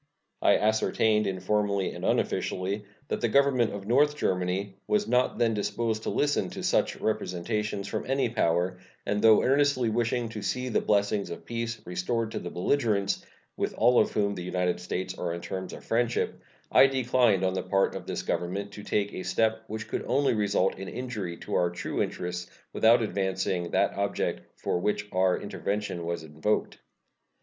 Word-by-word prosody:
I - - +5
ascertained, 110 0 +2
informally 100 +1 0
and - - -8
unofficially, 100 +3 0 0.2
that - - -2
the 120 - +2
Government 130 -3 +3
of 100 -1 -6
North 145 +6 +3
Germany 95 -1 -1
was 210 0 +1
not 125 0 +2
then 115 -2 +2
disposed 110 +2 -1
to - - -3
listen 145 0 +1
to - - -7
such - - +2
representations 105 0 -2
from - - -4
any 135 -1 +2
power, 90 -4 0 0.3
and 105 0 0
though 110 -1 +6
earnestly 135 -3 +3
wishing 120 +1 0
to 110 -2 -6
see 125 +3 -2
the - - +1
blessings 100 0 +1
of 85 - -8
peace 115 0 -3
restored 110 +6 -2
to - - -3
the 90 - -6
belligerents, 100 0 0 0.3
with - - -2
all 125 0 +5
of - - +2
whom 100 -1 +1
the 90 - -6
United 90 0 -1
States 90 +1 -4
are 85 -1 -2
on 85 - -7
terms 95 0 -5
of - - -10
friendship, 120 +1 0 0.3
I 135 - +8
declined 125 -6 +2
on 95 0 +1
the 95 - -1
part 95 +2 +1
of - - -7
this - - -3
Government 100 +3 -2
to 105 - -9
take 105 0 -1
a - - -4
step 110 +4 0
which 110 0 -5
could - - -3
only 135 +1 +2
result 100 -3 +1
in 95 - -6
injury 105 -9 -4
to - - -6
our 90 - +3
true 85 - -3
interests 90 0 -3 0.2
without 115 +1 +5
advancing 95 -3 -1
the - - +2
object 100 0 -2
for - - -1
which 105 +2 -1
our 95 0 +2
intervention 100 -3 -3
was 85 -1 -3
invoked. 80 +7 -1
105 Hz, 175 wpm, -28 LUFS, 95-115 Hz, 0.3 s, I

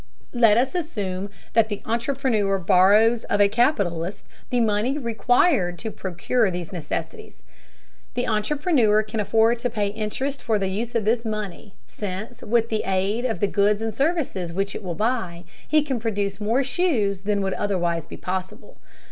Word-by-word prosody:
Let 230 -3 +5
us 260 +6 +1
assume 205 - -3 0.2
that 225 -1 +4
the 205 -2 -5
entrepreneur 230 -4 0
borrows 205 +5 +4
of 205 - 0
a 205 - +6
capitalist 200 - 0 0.2
the 245 - +1
money 225 +4 +1
required 235 - +2
to 220 +3 -5
procure 195 +5 0
these 175 0 -5
necessities. 430 - -6 0.7
The 245 - -1
entrepreneur 220 - +2
can 215 +1 -5
afford 225 +3 +3
to 245 +1 -1
pay 210 -3 -1
interest 225 +7 -3
for 220 -3 +1
the 195 -2 -1
use 230 +5 -3
of 220 -3 +1
this 230 +2 +2
money, 215 -3 -5
since 210 +4 -6
with 230 +1 +1
the 220 -1 0
aid 195 +5 0
of 230 -3 -2
the 205 - +3
goods 205 +1 +2
and 225 0 -3
services 275 - -1
which 195 +3 -2
it - - -6
will 175 -3 -4
buy, 210 -6 -1 0.2
he 305 -1 +3
can 270 -5 -2
produce 205 -2 -2
more 230 +6 +2
shoes 250 - 0
than 200 0 0
would 190 -1 -1
otherwise 175 -5 -1
be - - -9
possible. 185 - -6
215 Hz, 165 wpm, -23 LUFS, 195-240 Hz, 0.7 s, a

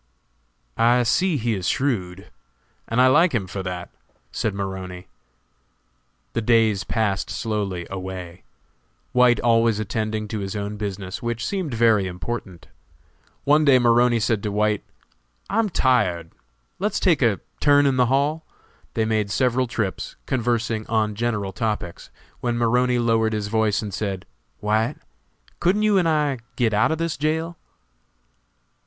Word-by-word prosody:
"I 120 +2 +4
see 175 +7 +2
he 120 -2 0
is 95 -4 -1
shrewd, 95 -9 -2 0.6
and 115 - -1
I 130 - +7
like 150 +4 +4
him 105 -5 0
for 95 +1 -5
that," 90 -1 -5 0.4
said 110 -3 -2
Maroney. 95 -2 -5 1.3
The 115 - 0
days 110 -3 +3
passed 105 -4 -1
slowly 100 -6 -3
away, 95 -2 -7 0.7
White 125 -1 +4
always 115 -2 +3
attending 110 +1 -2
to 110 - -3
his 95 +1 -4
own 105 0 -3
business, 100 -2 -5
which 120 -1 -3
seemed 180 -10 -2
very 110 -4 +3
important. 90 -1 -6 0.8
One 150 +2 +4
day 140 -3 +6
Maroney 120 0 +4
said 110 -1 0
to 105 - -3
White, 105 0 +1 0.7
"I'm 225 -1 +2
tired, 90 - +1 0.5
let's 205 +2 0
take 165 -7 +3
a 115 -6 +2 0.2
turn 145 0 +5
in 135 -2 +2
the 125 -1 +4
hall?" 145 +5 +1 0.5
They 110 - +1
made 110 -2 0
several 125 +3 +1
trips, 105 -5 -3
conversing 120 -3 -1
on 110 -2 +1
general 105 -3 -2
topics, 105 -5 -3 0.3
when 120 -1 -1
Maroney 125 +2 +2
lowered 115 -2 +2
his 105 -1 -2
voice 110 -1 +1
and 105 -2 -6
said: 95 -1 -3 0.4
"White, 110 +5 +1 0.6
couldn't 195 +5 +2
you 210 -2 +4
and 170 -2 +2
I 150 -4 +1 0.2
get 115 -3 +1
out 105 +8 +3
of 160 - 0
this 165 -3 -2
jail?" 160 +4 -1
115 Hz, 145 wpm, -23 LUFS, 100-125 Hz, 1.3 s, I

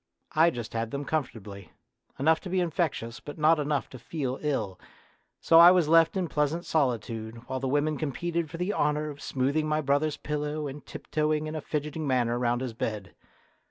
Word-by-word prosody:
I 160 +2 +5
just 120 -8 -6
had 115 0 -2
them 140 +4 -4
comfortably; 105 - -4 0.4
enough 160 +4 +3
to 185 - -8
be 185 +1 +1
infectious, 160 -9 -1
but 145 - -9
not 155 +1 +4
enough 145 -4 -1
to 130 - -9
feel 135 0 -4
ill, 110 -11 -2 0.6
so 165 - +6
I 170 +1 +11
was 180 -4 +4
left 165 +3 +5
in 185 -2 0
pleasant 155 +3 -1
solitude 115 -5 -2
while 130 0 -3
the 135 - -2
women 145 +2 +1
competed 165 +3 -2
for 165 - -7
the 180 +4 -1
honour 150 +1 0
of 145 - -12
smoothing 140 +4 0
my 155 0 +1
brothers' 145 +2 +1
pillow 150 0 -3
and 140 +1 -7
tiptoeing 155 0 -1
in 155 - -5
a 155 - -3
fidgeting 150 +1 -3
manner 120 -2 +1
round 120 0 +1
his 130 -3 -3
bed. 105 -4 -4
150 Hz, 190 wpm, -28 LUFS, 125-155 Hz, 0.6 s, I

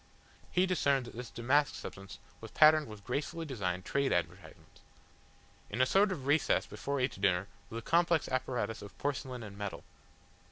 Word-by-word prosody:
He 180 +1 +3
discerned 140 -8 +1
that 120 - -11
this 125 +1 -6
damask 135 +5 +2
substance 95 0 -8 0.2
was - - -9
patterned 155 0 +6
with 105 -2 -10
gracefully 160 +7 -3
designed 95 - -3
trade 140 -1 +1
advertisements. 90 -1 -4 0.9
In 115 - -4
a 130 - +6
sort 195 +8 +4
of 140 -8 -4
recess 145 +3 +3
before 140 0 -3
each 125 -6 -1
diner 95 -1 +2 0.2
was 115 - -6
a 115 - -6
complex 170 +1 +3
apparatus 125 -4 -2
of 100 - -11
porcelain 130 -3 -3
and 100 -2 -9
metal. 100 -1 -5
130 Hz, 165 wpm, -32 LUFS, 105-150 Hz, 0.9 s, patterned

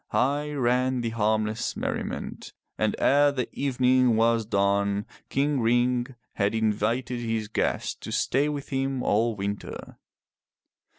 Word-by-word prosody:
High 145 +3 0
ran 125 -1 +1
the 115 -1 -2
harmless 110 0 0
merriment. - - -4 0.2
And - - 0
ere 145 +1 +4
the 130 -3 -2
evening 130 -3 +2
was 115 -1 +2
done 100 0 +1 0.2
King 140 0 +1
Ring 120 +2 +1 0.2
had 100 +1 +1
invited 110 +3 0
his 115 -2 -2
guest 110 - -2
to - - -7
stay 140 +3 +1
with 145 -2 -5
him 135 -1 -1
all 115 +2 +2
winter. 100 0 -6
120 Hz, 125 wpm, -26 LUFS, 110-130 Hz, 0.2 s, ere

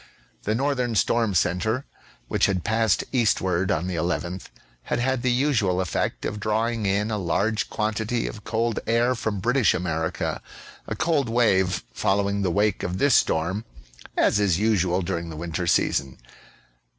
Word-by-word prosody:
The 105 - +1
northern 125 -2 0
storm 110 0 +2
centre, 110 +9 +1 0.4
which - - +2
had 95 -3 -1
passed 110 -1 +2
eastward 95 -7 +1
on 80 -3 0
the 90 -2 -3
11th, 85 +2 -2 0.4
had - - -1
had 130 +1 0
the 125 - +1
usual 120 -8 +1
effect 90 -2 -2
of 105 - -3
drawing 110 +1 0
in 105 +3 0
a 105 - -1
large 100 +5 0
quantity 110 +2 -1
of 105 - -6
cold 115 0 -1
air 120 +2 +3
from 110 -4 -3
British 120 +2 +2
America; 80 -2 -2 0.5
a - - -3
cold 160 -6 +1
wave 95 -6 +2
following 100 +1 0
the 95 - +1
wake 105 +2 +1
of 90 +1 -3
this 140 +5 +3
storm, 90 +5 +2 0.5
as - - +3
is 95 -5 +2
usual 95 -4 +1
during 85 0 -3
the 80 - -7
winter 85 +2 -3
season. 65 -5 +1
105 Hz, 155 wpm, -24 LUFS, 90-115 Hz, 0.5 s, air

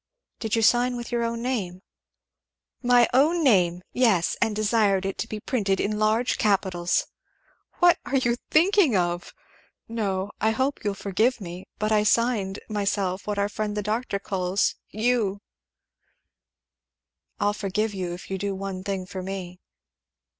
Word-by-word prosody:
"Did 220 -1 -1
you 225 - +1
sign 245 +2 +3
with 240 +1 -7
your 240 -1 0
own 230 0 -2
name?" 195 -8 -3 1.0
"My 245 -1 +5
own 315 +6 +3
name! 180 - +3
Yes, 220 -9 +2
and 225 -2 +1
desired 210 -3 +2
it 195 - -3
to - - -2
be 215 - -5
printed 205 -5 0
in 210 +1 -1
large 220 +3 +1
capitals. 185 -4 +1 0.7
What 350 -1 +5
are 275 - -1
you 245 -2 +1
thinking 340 - +4
of? 175 0 -1 0.6
No 200 -3 -2
I 220 - +3
hope 270 +2 -1
you'll 205 -1 -1
forgive 215 +6 0
me, 180 -2 -8
but 215 0 -1
I 215 -1 +4
signed 210 -3 +1
myself 200 -3 -1
what 210 -1 -2
our 200 0 +1
friend 210 0 -3
the 210 - -1
doctor 215 0 -1
calls 190 -1 0 0.2
'Yugh.'" 215 -3 0 2.0
"I'll 205 -1 +2
forgive 210 +1 -2
you 185 -3 -3
if 175 - -11
you'll 190 - -2
do 200 0 -2
one 190 -1 -5
thing 195 -2 -3
for 185 0 -6
me." 185 -1 -6
210 Hz, 155 wpm, -25 LUFS, 190-235 Hz, 2.0 s, My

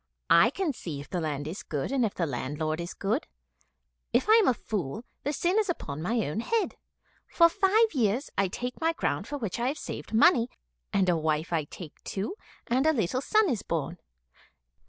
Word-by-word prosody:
I 190 +7 +7
can 330 +1 -1
see 160 - -6
if 145 - -10
the 180 - -1
land 145 -2 -3
is 175 +6 -5
good 145 - -3
and 270 -3 +2
if 215 - 0
the 170 - 0
landlord 150 +4 -2
is 170 +1 -6
good. 220 +9 -1 0.8
If - - +2
I 435 - +7
am 440 - +4
a - - +5
fool, 205 - -4 0.2
the 290 - -1
sin 350 +7 +1
is 425 -3 0
upon 155 - -3
my 225 +5 0
own 150 - -2
head. 445 - 0 0.5
For 335 - +6
five 410 +5 +3
years 245 +1 +1
I 195 - +2
take 250 - -5
my 325 +1 +2
ground - - -1
for 290 - -4
which 225 -5 -3
I 240 - +1
have 285 +4 -1
saved - - -7
money, 235 +1 +5 0.4
and 190 -2 +2
a 175 - +4
wife 160 +1 -1
I 160 -3 +1
take 155 +1 -11
too, 205 - -3 0.3
and 260 +5 +2
a 315 - +5
little 235 - 0
son 430 +8 +3
is 245 - 0
born." 165 +1 -3
220 Hz, 205 wpm, -28 LUFS, -, 0.8 s, I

